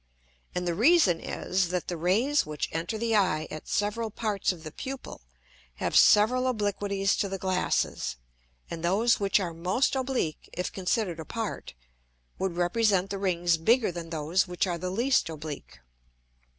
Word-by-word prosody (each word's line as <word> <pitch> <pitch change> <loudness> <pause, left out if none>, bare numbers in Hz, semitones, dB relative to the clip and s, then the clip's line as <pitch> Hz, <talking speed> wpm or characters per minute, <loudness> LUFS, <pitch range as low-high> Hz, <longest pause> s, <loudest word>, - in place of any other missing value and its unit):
And 180 0 -2
the 170 - +1
reason 220 - +4
is, 185 -1 -1
that 180 -1 -2
the 175 - -3
Rays 215 - +2
which 150 -1 -4
enter 165 +7 -3
the 225 0 0
Eye 160 -6 +2
at 155 - -8
several 215 +2 -1
parts 210 -2 -1
of 170 -3 -10
the 155 - -7
Pupil, 265 - -7 0.5
have - - -2
several 250 +5 +5
Obliquities 205 -4 0
to 200 - 0
the 195 - -3
Glasses, 185 - -1 0.5
and 165 - -6
those 210 +7 +3
which 200 0 +2
are 175 -4 -3
most 185 +12 0
oblique, 260 - -2
if 180 - -3
consider'd 185 -2 -1
apart, 210 - -5 0.6
would 190 -2 -1
represent 195 +1 +2
the 200 - -3
Rings 175 -3 +1
bigger 225 +6 +3
than 170 -1 -7
those 165 +4 0
which 180 +1 0
are 175 -2 -2
the 185 +2 -3
least 235 +2 +1
oblique. 155 -2 -7
190 Hz, 160 wpm, -28 LUFS, 170-220 Hz, 0.6 s, several